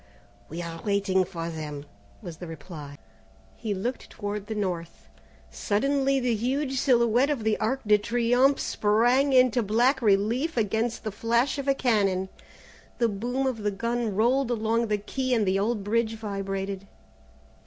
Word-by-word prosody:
"We 170 +3 -5
are 165 -1 -7
waiting 200 -2 +1
for 170 -2 -5
them," 150 -3 -6 0.4
was 170 -4 -7
the 175 - -8
reply. 150 -2 -9 0.6
He 215 -3 -3
looked 240 +7 -4
toward 205 -1 -5
the 220 - -4
north. 180 -5 -4 0.4
Suddenly 275 +5 +1
the 250 -2 +1
huge 265 +4 -1
silhouette 245 0 +3
of 275 -7 -1
the 220 -1 +2
Arc 260 +5 0
de 210 0 +5
Triomphe 245 +5 +2
sprang 240 +7 +2
into 255 -2 +4
black 240 +6 +2
relief 230 +9 +1
against 225 +2 0
the 215 - -3
flash 235 +7 0
of 280 - -4
a 275 - +3
cannon. 195 -7 +1 0.7
The 235 -1 +2
boom 245 +6 -2
of 255 -4 -1
the 210 0 0
gun 230 +1 -2
rolled 245 +5 +2
along 230 0 0
the 210 -1 +1
quay 255 +5 -1
and 220 -3 +2
the 190 +1 +1
old 210 0 -1
bridge 225 +2 0
vibrated. 195 -2 -4
220 Hz, 155 wpm, -26 LUFS, 195-245 Hz, 0.7 s, de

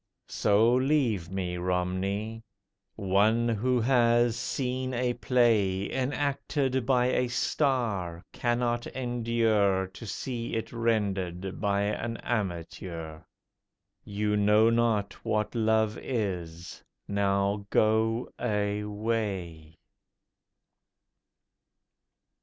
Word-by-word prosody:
So 110 +3 +3
leave 130 - +1
me, 90 -2 -3
Romney. 95 +5 -2 0.5
One 105 +4 +2
who 120 +3 +1
has 120 -1 +3
seen 130 0 -2
a 125 0 0
play 110 -7 +2
Enacted 135 -1 -1
by 125 -1 +3
a 125 0 +1
star 115 - -1
cannot 120 0 0
endure 115 -6 +1
To 95 +4 -11
see 115 +2 -4
it 115 - -4
rendered 95 -6 -1
by 100 -1 +1
an 115 +3 -2
amateur. 85 -6 -4 0.8
You 105 +1 -1
know 105 +2 +4
not 110 -4 0
what 105 0 -1
Love 110 -1 +1
is—now 100 0 -2
go 110 +2 +2
away! 105 -6 -2
110 Hz, 85 wpm, -28 LUFS, 100-120 Hz, 0.8 s, know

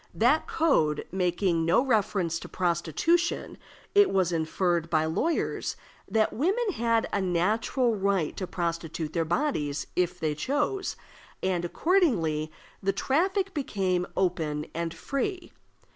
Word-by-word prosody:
That 255 +8 +3
code 160 - +2
making 180 -2 +1
no 170 +10 +3
reference 195 -8 +1
to - - -9
prostitution, 180 - 0 0.3
it 410 0 +6
was 185 -3 +2
inferred 170 +1 0
by 155 -1 +2
lawyers 305 - -1 0.3
that 220 -1 +2
women 400 - +1
had 230 -3 +1
a 200 - +1
natural 210 +7 +1
right 195 -5 0
to 185 - -4
prostitute 165 -3 -3
their 165 -2 +1
bodies 160 - -1
if 180 0 0
they 155 -2 0
chose, 290 - -1 0.5
and 185 -2 0
accordingly 175 - +1 0.3
the 195 0 +1
traffic 375 - 0
became 190 - -1
open 160 -5 0
and 170 0 -2
free. 275 - -3
185 Hz, 125 wpm, -27 LUFS, 165-270 Hz, 0.5 s, it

